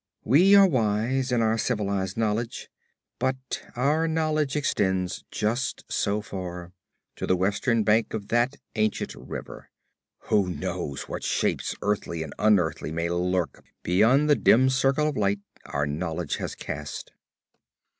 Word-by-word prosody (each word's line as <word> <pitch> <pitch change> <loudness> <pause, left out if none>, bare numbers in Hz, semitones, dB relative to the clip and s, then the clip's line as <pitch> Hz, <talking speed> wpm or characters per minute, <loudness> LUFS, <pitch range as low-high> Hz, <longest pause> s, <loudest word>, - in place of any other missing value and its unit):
We 180 - +6
are 200 0 +9
wise 125 - +1
in 120 -2 +2
our 110 0 +1
civilized 100 -5 -1
knowledge, 115 +3 -2 0.5
but 130 -1 -2
our 150 +6 +2
knowledge 155 -3 0
extends 95 -10 0
just 115 +4 -1
so 105 +1 0
far 90 -3 -7 0.4
to - - -3
the 95 - +3
western 105 +5 +1
bank 110 +2 +2
of 100 -2 -6
that 120 +4 +2 0.2
ancient 110 -1 -1
river! - - -9 0.6
Who 100 -3 +3
knows 70 -3 -4
what - - -6
shapes - - 0
earthly 100 -5 -1
and 80 - -8
unearthly 100 -7 +2
may 85 +1 -1
lurk 90 0 -1 0.2
beyond 115 - +4
the 150 - +5
dim 130 +1 +5
circle 135 +3 +2
of 150 - -2
light 100 -1 +1 0.2
our 70 - -1
knowledge 80 +3 -3
has - - -5
cast? - - -6
110 Hz, 135 wpm, -26 LUFS, 95-130 Hz, 0.6 s, are